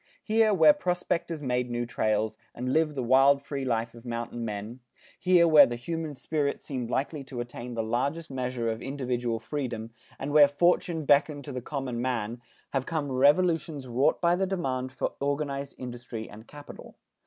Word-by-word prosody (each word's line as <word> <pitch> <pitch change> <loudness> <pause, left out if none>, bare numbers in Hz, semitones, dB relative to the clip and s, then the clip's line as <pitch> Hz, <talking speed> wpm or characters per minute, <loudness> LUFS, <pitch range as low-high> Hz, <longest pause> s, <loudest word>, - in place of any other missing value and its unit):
Here, 220 0 +3
where 210 +9 +7
prospectors 175 - -2
made 125 -1 0
new 120 0 -2
trails, 110 -1 0 0.2
and 130 +2 -2
lived 155 -2 +2
the 130 - -2
wild 135 +3 +5
free 140 -1 -4
life 115 -2 -1
of 115 -1 -13
mountain 120 0 -4
men, 105 +3 -5 0.4
here 180 -2 +5
where 150 -4 +8
the 120 - -3
human 160 +4 -4
spirit 145 +2 -1
seemed 125 -4 -5
likely 140 +3 -2
to 130 -2 -7
attain 120 0 -6
the 115 - -1
largest 140 +8 -2
measure 125 -2 -2
of 110 +1 -5
individual 125 -4 -2
freedom, 115 -2 -4 0.3
and 140 +2 -4
where 150 -1 +8
fortune 160 +2 +1
beckoned 145 0 +3
to 145 - -6
the 125 -1 -4
common 130 -3 -4
man, 120 -2 -2 0.3
have 135 -1 -1
come 150 -4 -2
revolutions 150 +1 +2
wrought 125 +3 +2
by 170 0 +3
the 190 +1 0
demand 130 -9 -2
for 130 - -3
organized 140 -1 -2
industry 120 -3 -7
and 110 +3 -13
capital. 145 0 -12
135 Hz, 175 wpm, -28 LUFS, 120-150 Hz, 0.4 s, where